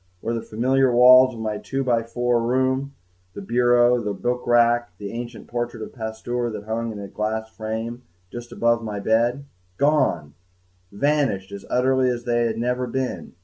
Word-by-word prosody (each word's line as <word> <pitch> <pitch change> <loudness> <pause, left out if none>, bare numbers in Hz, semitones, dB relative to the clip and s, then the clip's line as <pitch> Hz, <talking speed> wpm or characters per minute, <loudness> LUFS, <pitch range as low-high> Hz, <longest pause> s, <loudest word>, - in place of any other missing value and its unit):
Where 115 - -2
were 115 - -1
the - - -10
familiar 130 +4 +2
walls 130 +1 +7
of 115 - -7
my 110 -1 -3
two 135 0 -3
by 120 -3 +2
four 120 +1 0
room, 130 +3 0 0.4
the 100 - -6
bureau, 120 +2 +3
the 105 -2 -3
book 125 +4 -2
rack, 120 -4 +3
the 100 0 -6
ancient 120 +1 -7
portrait 120 -1 -4
of - - -9
Pasteur 120 +1 -3
that 105 -2 -6
hung 115 +1 -3
in 105 - -8
its 100 -1 -9
glass 110 +1 -2
frame 110 +2 -5 0.3
just 120 0 -8
above 115 0 +2
the 115 - -9
foot 105 -1 -4
of 100 - -6
the - - -4
bed? 120 +5 +2 0.3
Gone! 145 - +1 0.6
vanished 130 -4 0
as 100 -1 -8
utterly 130 0 +2
as 120 -1 -3
though 120 - -1
they 120 0 +2
had 110 -1 -3
never 125 +2 -1
been! 125 -10 -4
120 Hz, 195 wpm, -23 LUFS, 110-125 Hz, 0.6 s, walls